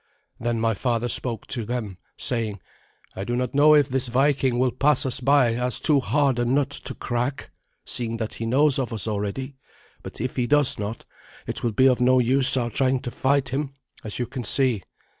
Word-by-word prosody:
Then 120 -1 -2
my 115 0 +1
father 120 +2 -1
spoke 120 -1 0
to 120 - -2
them, 110 -5 -5 0.2
saying, 110 -5 -2 0.6
"I 95 - -5
do 120 +4 -3
not 125 -1 -2
know 150 +2 +5
if 145 -2 +4
this 130 -1 -1
Viking 130 0 +1
will 130 0 +1
pass 145 +1 +2
us 130 - +1
by 130 -2 +3
as 125 +1 -1
too 150 -3 +4
hard 135 -1 0
a - - +1
nut 135 +3 0
to 135 - -5
crack, 125 +3 -4 0.3
seeing 115 -1 -3
that 110 -1 -4
he 115 - -5
knows 140 +3 +2
of 125 -2 -3
us 110 -1 -2
already; 110 +6 -4 0.4
but - - -10
if 130 +4 -4
he 125 -1 0
does 145 -4 +3
not, 105 +2 -5 0.4
it - - -3
will 115 -2 -1
be 130 +5 +3
of 125 -1 +2
no 130 +1 +4
use 130 +2 +5
our 120 -2 -2
trying 130 +3 +1
to 125 -3 -6
fight 135 +1 0
him, 135 +1 -4 0.3
as 105 - -5
you 125 - -2
can 125 +1 -7
see. 125 -2 +2
125 Hz, 205 wpm, -23 LUFS, 115-135 Hz, 0.6 s, know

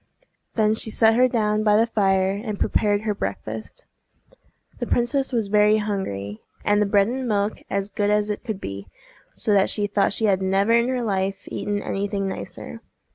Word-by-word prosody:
Then 215 -1 +3
she 220 - -2
set 220 0 +4
her 250 +2 +4
down 215 -3 0
by 210 -1 +4
the 225 - +4
fire, 195 -4 +2
and 205 +1 -4
prepared 205 -1 +1
her 215 -1 -1
breakfast. - - -6 0.9
The - - -3
princess 265 +3 +1
was 230 -4 0
very 210 +1 +4
hungry, 110 - -4 0.2
and 205 0 +3
the 210 - +2
bread 200 0 +3
and 255 +2 -3
milk 205 -1 0
as 200 +1 -2
good 205 +1 0
as 210 0 +1
it 205 - -5
could 220 -6 -4
be, 100 - -7 0.4
so 210 - +1
that 195 -1 +4
she 205 - 0
thought 200 -1 +1
she 220 - 0
had 195 -2 +2
never 195 +3 +2
in 235 +1 +4
her 255 -1 -1
life 195 -2 -2
eaten 205 0 -2
any 200 +1 -2
thing 195 -1 -2
nicer. 190 - -7
210 Hz, 190 wpm, -23 LUFS, 195-220 Hz, 0.9 s, set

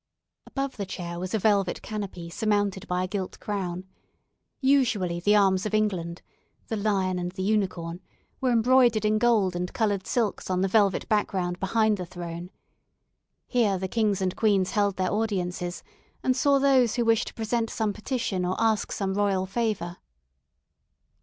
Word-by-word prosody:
Above 275 -1 -3
the 200 - -3
chair 170 -2 -5
was 185 +3 -3
a - - +3
velvet 200 -3 +2
canopy 200 -5 -5
surmounted 205 +1 -1
by 180 0 0
a - - -2
gilt 190 -1 -4
crown. 185 -3 -3 0.8
Usually 230 - +2
the 205 +4 +3
arms 195 -1 +3
of 215 - -1
England 180 -5 -1 0.5
(the 225 - -1
"Lion 195 -3 0
and 175 0 -3
the 190 -1 -4
Unicorn") 185 -4 -1 0.4
were 260 - +2
embroidered 235 -2 +4
in 215 0 +2
gold 215 -6 +3
and 180 +1 -3
coloured 205 -4 0
silks 225 -6 -1
on 185 0 +1
the 195 - +2
velvet 200 -1 +2
background 190 -5 0
behind 215 +2 +2
the 180 - -4
throne. 175 0 -7 1.0
Here 220 -6 +2
the 190 +1 -3
kings 205 -2 0
and 185 -1 -1
queens 200 -4 +2
held 205 -3 +1
their 185 -1 -1
audiences, 180 -5 -2 0.4
and 255 - +2
saw 280 +2 +3
those 265 -4 +3
who 240 -1 +1
wished 225 -1 +3
to - - -7
present 225 0 -1
some 215 -2 -1
petition 215 -4 -2
or 180 +1 0
ask 220 -2 +1
some 195 -1 -2
royal 195 -2 +1
favour. 195 -4 -2
200 Hz, 165 wpm, -26 LUFS, 185-220 Hz, 1.0 s, embroidered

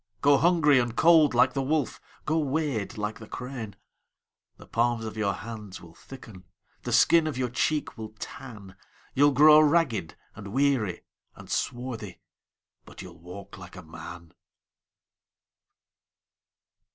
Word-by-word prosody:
Go 140 -1 +5
hungry 160 -5 +4
and 120 -1 -2
cold 160 -4 +5
like 130 +1 +4
the 135 - -1
wolf, 145 0 -1 0.2
Go 160 +1 +1
wade 140 -8 -2
like 105 0 -4
the 110 - -11
crane:The 120 -6 -12
palms 120 -1 0
of 110 - -6
your 105 -2 0
hands 105 -3 -9
will 85 -1 -15
thicken, 110 -4 -13 0.4
The - - -5
skin 165 -2 +4
of 150 - -4
your 125 -2 -2
cheek 145 +2 -1
will 110 -1 -8
tan, 110 -9 -10 0.4
You 145 +2 +4
'll - - +3
grow 150 +3 +7
ragged 145 - +1 0.2
and 100 - -10
weary 130 -8 0 0.3
and - - -12
swarthy, 120 -6 -4 0.6
But - - -12
you 90 - -10
'll 85 - -18
walk 100 +4 -11
like 90 -2 -12
a 90 - -10
man! 85 +1 -11
120 Hz, 140 wpm, -26 LUFS, 105-145 Hz, 0.6 s, grow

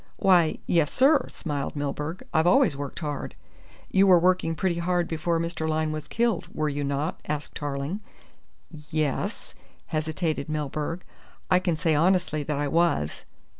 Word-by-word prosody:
"Why, 180 -5 +4
yes, 165 -4 +2
sir," 275 0 +4
smiled 145 -4 -4
Milburgh. 150 +4 -3
"I've 160 +2 +3
always 250 - +4
worked 140 -1 -6
hard." 145 -3 -4 0.6
"You 195 +1 +5
were 185 -2 +8
working 175 -1 +2
pretty 170 +1 0
hard 175 0 +1
before 165 +1 -1
Mr. 165 -1 -2
Lyne 155 0 0
was 155 -1 -5
killed, 235 -1 0
were 155 -1 -1
you 145 0 -2
not?" 140 +4 -2
asked 150 -1 -3
Tarling. 145 +6 -3 0.9
"Yes 150 -3 -2 0.2
" - - -34
hesitated 155 -1 -1
Milburgh. 155 +3 -3 0.5
"I 180 - +6
can 180 -3 0
say 155 +1 +1
honestly 170 -1 +2
that 145 0 -2
I 145 0 0
was." 165 - +1
160 Hz, 155 wpm, -26 LUFS, 150-175 Hz, 0.9 s, were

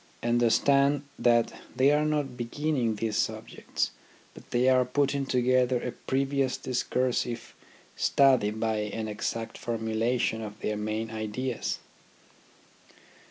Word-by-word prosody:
Understand 140 +4 +3 0.2
that 120 -1 +3 0.2
they 135 +2 +5
are 150 +1 +3
not 145 -4 -1
beginning 125 -1 -1
these 110 0 -2
subjects, - - -2 0.4
but - - -15
they 125 +1 +2
are 130 -1 +5
putting 140 +2 0
together 125 0 +2
a 125 - -4
previous 135 0 -1
discursive 125 -1 -1 0.4
study 130 -6 +4
by 110 0 -1
an 105 +1 -3
exact 110 +2 -4
formulation 115 0 -1
of 105 -1 -7
their 105 - -1
main 110 +1 -3
ideas. 110 +3 -3
120 Hz, 115 wpm, -28 LUFS, 110-135 Hz, 0.4 s, they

